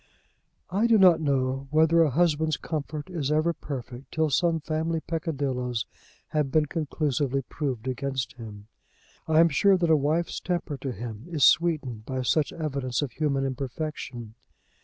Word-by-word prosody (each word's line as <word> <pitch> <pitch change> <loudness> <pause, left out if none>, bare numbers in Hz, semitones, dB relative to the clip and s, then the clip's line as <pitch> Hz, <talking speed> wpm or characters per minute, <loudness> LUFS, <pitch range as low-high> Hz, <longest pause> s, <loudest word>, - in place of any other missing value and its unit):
I 205 +5 +2
do 230 -1 +5
not 180 -5 +6
know 135 -2 0
whether 160 +2 +4
a 160 - +4
husband's 155 +1 +2
comfort 150 -1 -4
is 160 -6 -2
ever 155 +3 +2
perfect 130 -3 -7
till 160 -2 0
some 165 +3 +2
family 160 +1 -1
peccadilloes 135 - -2 0.4
have 150 -3 0
been 155 +2 +3
conclusively 145 -3 -1
proved 130 -3 -4
against 130 0 -2
him. 105 -4 -10 0.6
I 160 0 +4
am 165 0 +6
sure 195 +6 +4
that 170 -2 +1
a - - +7
wife's 155 +4 0
temper 175 -4 -2
to 135 0 -4
him 115 - -7
is 155 -5 0
sweetened 145 -11 +3
by 130 -1 -2
such 150 +4 +1
evidence 140 -5 -2
of 140 - -4
human 140 -3 0
imperfection. 130 -3 -5
150 Hz, 155 wpm, -26 LUFS, 130-160 Hz, 0.6 s, a